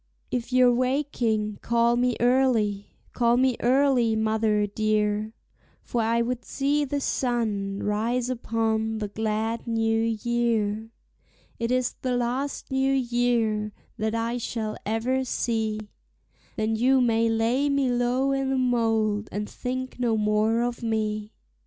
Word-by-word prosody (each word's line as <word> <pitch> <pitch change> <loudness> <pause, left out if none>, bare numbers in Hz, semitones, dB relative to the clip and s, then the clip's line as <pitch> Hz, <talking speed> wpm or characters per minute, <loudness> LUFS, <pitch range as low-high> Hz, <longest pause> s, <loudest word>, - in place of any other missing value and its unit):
If 245 0 -3
you're 250 -1 +5
waking, 240 -5 0
call 235 0 +2
me 245 0 +1
early, 235 -5 +1 0.2
call 235 0 +3
me 255 -1 +3
early, 250 -3 +3
mother 220 -1 +1
dear, 215 +1 0 0.5
For 240 - -1
I 230 +1 +2
would 245 0 -3
see 290 +2 0
the 285 +1 -2
sun 215 -7 -1
rise 230 +4 0
upon 225 -2 -1
the 210 -2 -3
glad 220 +2 -2
new 225 -1 +1 0.2
year. 225 -2 0 0.7
It 230 0 -1
is 255 -1 +1
the 255 -1 0
last 255 +4 -2
new 265 0 +2
year 240 -4 0 0.3
that 220 +1 -1
I 230 +2 -1
shall 220 -2 -3
ever 245 +5 0
see, 220 -3 -1 0.8
Then 220 +1 0
you 260 +4 +3
may 230 -2 +2
lay 230 +6 +1
me 280 -2 +1
low 245 +3 +1
i' 270 0 0
the 265 0 0
mold, 225 -4 +1
and 210 +1 -3
think 255 0 -5
no 235 -3 +1
more 215 +2 +2
of 240 0 -3
me. 215 -2 -2
230 Hz, 135 wpm, -26 LUFS, 220-250 Hz, 0.8 s, you're